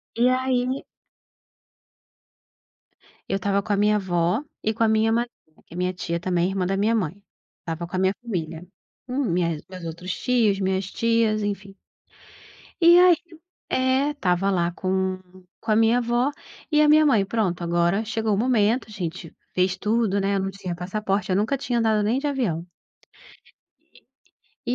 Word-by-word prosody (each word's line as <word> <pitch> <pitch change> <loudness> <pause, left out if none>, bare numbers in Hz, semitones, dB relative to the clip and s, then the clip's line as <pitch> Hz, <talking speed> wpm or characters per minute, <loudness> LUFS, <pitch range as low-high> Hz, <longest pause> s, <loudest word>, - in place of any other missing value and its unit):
E 240 +2 +3
aí 255 0 0 2.5
eu - - 0
estava 200 +1 0
com 210 0 -2
a - - +1
minha 210 +1 +3
avó 180 - 0 0.2
e 220 - +1
com 230 - 0
a - - +4
minha 220 0 +2
madrinha, 235 -9 -4
que - - -16
é - - -8
minha 180 0 0
tia 170 -1 -3
também, 175 0 0
irmã 195 -1 -1
da 195 +2 -1
minha 215 +3 +2
mãe, 195 -2 -2 0.4
estava 165 +1 -5
com 180 - -7
a - - 0
minha 190 +1 +2
família, 170 -7 -4 0.4
hum, 260 +2 -1
minhas 175 -4 +1
minhas 150 - -6
meus 185 -3 -9
outros 170 +3 -5
tios, 225 -6 +1
minhas 190 0 0
tias, 230 -2 +1
enfim. 200 -1 -4 1.1
E 340 +1 +8
aí 360 -1 +7 0.5
É, 260 +3 +2
estava 195 -8 0
lá 175 -2 +1
com 185 +1 -1 0.4
com 225 - -2
a - - +4
minha 225 +2 +4
avó 240 +4 +1 0.4
e 300 0 +4
a 300 - +5
minha 310 +1 +6
mãe, 220 -9 +3
pronto, 195 -5 -1
agora 175 +5 +1
chegou 220 -1 -1
o - - -2
momento, 235 0 +2
a - - -12
gente 175 -4 -6 0.2
fez 185 0 +1
tudo, 210 -1 +1
né, 200 +1 0
eu - - +1
não 195 0 -2
tinha 190 -2 -5
passaporte, 195 +2 -2
eu - - +2
nunca 225 +7 +1
tinha 245 -2 -1
andado 220 -2 +2
nem 220 +5 +1
de 295 - -2
avião. 220 - -1 2.0
E 245 - +1
205 Hz, 175 wpm, -24 LUFS, 185-235 Hz, 2.5 s, E